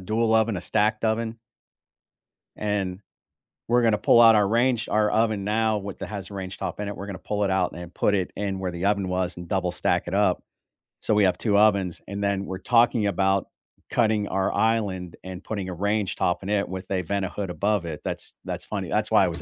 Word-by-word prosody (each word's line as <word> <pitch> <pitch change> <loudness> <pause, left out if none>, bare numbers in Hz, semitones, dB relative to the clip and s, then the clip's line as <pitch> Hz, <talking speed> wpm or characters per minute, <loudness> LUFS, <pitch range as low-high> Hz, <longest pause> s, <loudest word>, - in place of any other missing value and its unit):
dual 110 +4 +1
oven, 110 -2 +2
a - - -3
stacked 110 +4 0
oven 110 +1 0 1.2
and 100 -3 -2 0.7
we're 120 +1 +3
gonna 110 -2 +3
pull 115 - +5
out 115 -1 +8
our 105 -2 +4
range 120 +1 +1
our 105 0 +2
oven 110 -3 +1
now 110 +1 +1
with 100 -1 -7
that - - -5
has 100 -2 -7
range 95 -1 -6
top 95 -2 -5
in 105 - -3
it, 105 - -4
we're 100 - -7
gonna 100 -2 -7
pull 105 -1 -2
it 95 - +1
out 95 -1 +1
and 85 0 -9
put 100 - +2
it 95 -2 -1
in 100 -2 -2
where 95 -1 -2
the 85 +2 -4
oven 100 -2 +1
was 90 -1 -2
and 85 - -8
double 90 -1 0
stack - - 0
it - - -4
up - - +2 0.6
so - - +1
we 105 -1 +4
have 90 - +2
2 105 -3 +1
ovens, 100 -4 +3
and 100 +1 -4
then 100 -1 0
we're 95 -1 -5
talking 115 +1 +3
about 95 0 +1 0.4
cutting 110 -3 +1
our 95 0 0
island 100 -6 0
and 95 0 -8
putting 100 -4 -4
a - - -4
range 100 +2 -1
top 90 0 0
in 100 - -5
it 100 -1 +1
with 95 0 -6
a 95 -1 +1
Vent-A-Hood 100 +1 -3
above 100 +1 0
it. 80 -3 -5
That's - - -5
that's - - -4
funny. - - -4
That's - - 0
why - - +6
I - - +1
was - - -4
100 Hz, 225 wpm, -25 LUFS, 95-110 Hz, 1.2 s, out